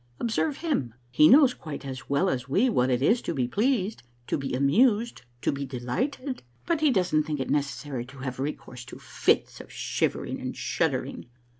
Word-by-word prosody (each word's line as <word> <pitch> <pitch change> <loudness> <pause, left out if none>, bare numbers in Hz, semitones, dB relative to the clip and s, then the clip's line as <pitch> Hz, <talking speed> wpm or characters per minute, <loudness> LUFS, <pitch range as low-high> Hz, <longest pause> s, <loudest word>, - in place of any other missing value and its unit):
Observe 270 +5 0
him. 215 - -2 0.2
He 150 +5 +6
knows 270 -1 +7
quite 150 -3 -8
as 130 -1 -7
well 140 +7 +2
as 130 -6 -2
we 235 - +3
what 125 - +2
it 125 +1 +1
is 230 +11 +3
to 170 - -3
be 125 -3 0
pleased, 215 - 0 0.2
to - - -1
be 135 -2 -3
amused, 215 - +3 0.2
to - - +2
be 140 0 -4
delighted, 245 - -3 0.2
but 330 -2 0
he 305 - +5
doesn't 180 - +2
think 150 -2 -3
it 130 - -2
necessary 140 -3 -2
to 135 +2 -14
have 130 -1 -5
recourse 130 -3 -5
to - - -10
fits - - 0
of - - -15
shivering - - -2
and - - -5
shud - - +1
dering. - - -5
145 Hz, 190 wpm, -27 LUFS, -, 0.2 s, knows